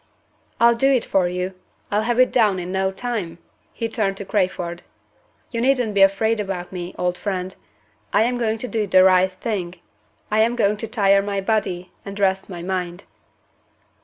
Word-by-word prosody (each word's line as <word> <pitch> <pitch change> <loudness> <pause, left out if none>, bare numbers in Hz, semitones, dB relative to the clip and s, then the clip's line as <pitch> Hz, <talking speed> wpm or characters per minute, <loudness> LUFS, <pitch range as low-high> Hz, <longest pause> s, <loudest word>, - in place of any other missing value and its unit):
"I'll 235 0 +6
do 270 +4 +2
it 255 -4 +2
for 185 -2 +2
you! 180 +1 -3 0.4
I'll 205 +1 +2
have 240 +2 0
it 255 - +5
down 215 -6 +3
in 180 0 -5
no 190 0 0
time!" 190 -5 -4 0.3
He 230 - -3
turned 210 -4 -1
to 200 - -6
Crayford. 180 -3 -1 0.7
"You 230 -2 -2
needn't 250 -4 +2
be 200 - +2
afraid 215 +3 +3
about 190 -3 -4
me, 180 -1 -6
old 180 0 -1
friend. 190 -2 -3 0.6
I 205 - +4
am 245 +1 0
going 225 -2 0
to 250 - -5
do 220 -3 -1
the 185 -1 +6
right 185 0 +5
thing. 185 -2 -4 0.6
I 215 - +2
am 230 +2 +3
going 210 -3 +2
to 225 - -5
tire 200 -3 +3
my 200 0 -2
body 190 -3 -1
and 200 +1 -7
rest 190 0 +1
my 175 -2 -7
mind." 180 -1 -3
195 Hz, 185 wpm, -22 LUFS, 185-225 Hz, 0.7 s, I'll